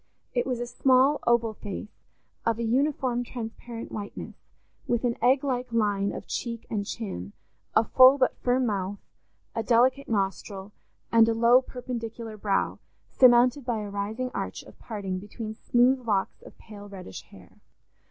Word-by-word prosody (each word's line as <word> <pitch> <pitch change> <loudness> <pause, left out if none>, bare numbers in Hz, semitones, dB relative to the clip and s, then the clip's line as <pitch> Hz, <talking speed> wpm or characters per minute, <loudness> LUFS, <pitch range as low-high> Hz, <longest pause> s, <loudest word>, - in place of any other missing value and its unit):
It 245 0 0
was 250 -2 -1
a 240 - -2
small 260 +3 +3
oval 235 -2 +3
face, 205 0 -8 0.4
of 230 -1 +1
a 235 - -2
uniform 255 0 +1
transparent 235 -1 -7
whiteness, 205 -1 -6 0.5
with 240 0 0
an 240 -1 +1
egg 260 +3 +4
like 250 -3 -2
line 205 -3 +1
of - - -7
cheek 230 -2 -4
and 200 -2 -2
chin, 100 - -5 0.4
a 220 - +6
full 260 +4 +7
but 255 -2 +2
firm 250 +1 +1
mouth, 200 -2 -2 0.6
a 225 - -1
delicate 250 +4 +2
nostril, 195 -1 -2 0.4
and 230 0 +6
a 225 - +1
low 235 +3 +6
perpendicular 235 -3 -6
brow, 200 -2 -1 0.3
surmounted 250 +2 +5
by 235 -2 -1
a 205 -1 -6
rising 215 +6 -3
arch - - -4
of - - -16
parting 195 -5 -4
between 215 +2 -7
smooth 245 +4 +3
locks 195 -3 0
of - - -15
pale 205 -1 -12
reddish 185 - -9
hair. - - -17
230 Hz, 155 wpm, -27 LUFS, 210-250 Hz, 0.6 s, full